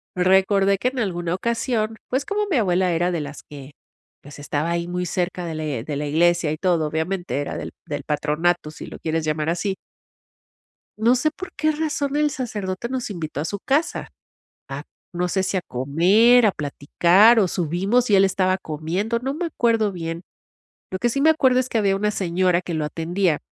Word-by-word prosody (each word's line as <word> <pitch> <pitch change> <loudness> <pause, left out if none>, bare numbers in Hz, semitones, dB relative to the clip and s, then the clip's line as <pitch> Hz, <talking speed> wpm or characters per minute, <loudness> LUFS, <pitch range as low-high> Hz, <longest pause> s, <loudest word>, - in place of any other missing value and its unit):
recordé 190 +2 +3
que 250 - 0
en 260 - -11
alguna 175 -4 -1
ocasión, 225 0 -1
pues, 265 +2 -1
como 415 0 -1
mi 305 - +3
abuela 185 -4 +2
era 175 +2 +1
de 170 - -1
las 145 0 -7
que, 140 -1 -10 0.5
pues, 145 +1 -12
estaba 145 +2 -2
ahí 170 0 -1
muy 180 0 -2
cerca 180 +1 -2
de 165 -2 -4
la 155 - -4 0.2
de 145 +2 -4
la 150 - -2
iglesia 170 +1 +2
y 155 - -3
todo, 170 -3 +1
obviamente 175 +1 -2
era - - -4
del - - -6 0.2
del 145 -1 -4
patronato, 150 +3 0
si - - -9
lo - - -9
quieres 160 0 -2
llamar 155 +1 -1
así. 190 +3 -1 1.2
No 230 +3 +4
sé 305 +5 +1
por 375 +4 -9
qué 310 +1 +2
razón 295 -2 -2
el 300 0 +2
sacerdote 215 -5 -4
nos 255 -3 -3
invitó 155 -6 -4
a - - -2
su 200 +5 -3
casa. 290 - 0
A - - -11 1.1
no 180 0 0
sé 190 +2 0
si 190 0 -1
a - - +1
comer, 185 - +4
a - - +5
platicar 175 +10 +4
o 205 - +4
subimos, 195 +9 0
y 200 - +6
él 195 - +6
estaba 185 0 +1
comiendo, 180 +9 -2
no 265 +2 -2
me 345 +3 -2
acuerdo 225 -8 +1
bien, 165 -1 -5 0.7
lo 185 - -4
que 240 - +1
sí 275 - -1
me 315 - +5
acuerdo 260 -5 +3
es 255 - -1
que - - 0
había 200 -3 +2
una 210 +1 0
señora 180 -1 +1
que 175 - -6
lo 155 -1 -1
atendía, 165 +1 0
185 Hz, 200 wpm, -22 LUFS, 165-230 Hz, 1.2 s, y